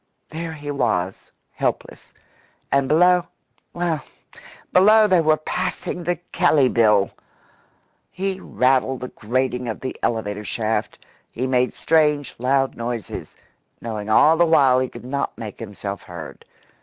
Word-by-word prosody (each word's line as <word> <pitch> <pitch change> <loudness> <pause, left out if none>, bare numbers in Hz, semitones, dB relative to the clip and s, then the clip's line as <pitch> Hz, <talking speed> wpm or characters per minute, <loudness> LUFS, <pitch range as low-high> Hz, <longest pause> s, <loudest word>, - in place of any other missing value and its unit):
There 165 +1 -5
he 145 -1 -6
was 105 -9 -2 0.2
helpless. - - -4 0.6
And 140 -1 +2
below 180 +4 +4 0.4
well, 170 -5 -2 0.7
below 215 +4 +6
they 185 -4 +4
were 155 -1 +3
passing 175 +2 -3
the 175 +1 0 0.2
Kelley 140 -4 +3
Bill! 105 -5 +3 1.0
He 190 +1 -3
rattled 130 -4 +1
the 125 - -5
grating 125 +2 -2
of 110 - -5
the 130 - -4
elevator 105 -2 -2
shaft. 110 0 -2 0.3
He 125 - -3
made 125 -1 +1
strange, 150 -4 +2
loud 135 +2 +1
noises, 115 -1 -5 0.4
knowing 110 -2 -5
all 155 +9 +5
the 170 - +5
while 135 -5 +5
he 130 -1 -1
could - - -11
not 140 +2 -3
make 110 -3 -8
himself 100 -2 -6
heard. 85 -3 -10
130 Hz, 130 wpm, -22 LUFS, 115-160 Hz, 1.0 s, below